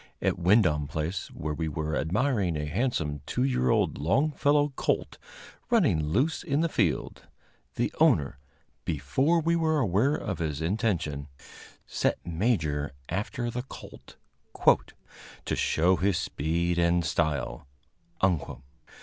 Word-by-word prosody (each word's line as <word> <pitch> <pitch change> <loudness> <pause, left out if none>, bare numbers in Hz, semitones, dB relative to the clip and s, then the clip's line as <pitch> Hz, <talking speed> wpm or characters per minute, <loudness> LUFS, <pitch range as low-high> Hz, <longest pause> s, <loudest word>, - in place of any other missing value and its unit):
At - - 0
Wyndom 85 -6 +3
Place, 80 +4 -3
where 75 0 -5
we 80 +2 -2
were 80 +1 -2
admiring 95 - 0
a 75 - -2
handsome 75 - -1
two 125 - 0
year 125 - +1
old - - +1
Longfellow 145 - +2
colt, - - -1 0.5
running 155 - +3
loose 130 - +1
in 150 -3 0
the 165 - +1
field, - - -1 0.5
the - - -1
owner, 70 -2 +3 0.4
before 135 - +1
we 170 +2 +2
were 160 -2 +2
aware 120 +4 +2
of 95 -7 -4
his 75 -4 -2
intention, 85 - -1 0.6
set - - 0
Major 80 - 0 0.2
after 120 +4 -2
the 125 - -3
colt 130 - -12 1.3
"to - - -1
show 90 +3 +2
his 95 +1 +1
speed 85 +4 -1
and 85 0 +2
style." 75 -4 -1
90 Hz, 125 wpm, -28 LUFS, 75-130 Hz, 1.3 s, Wyndom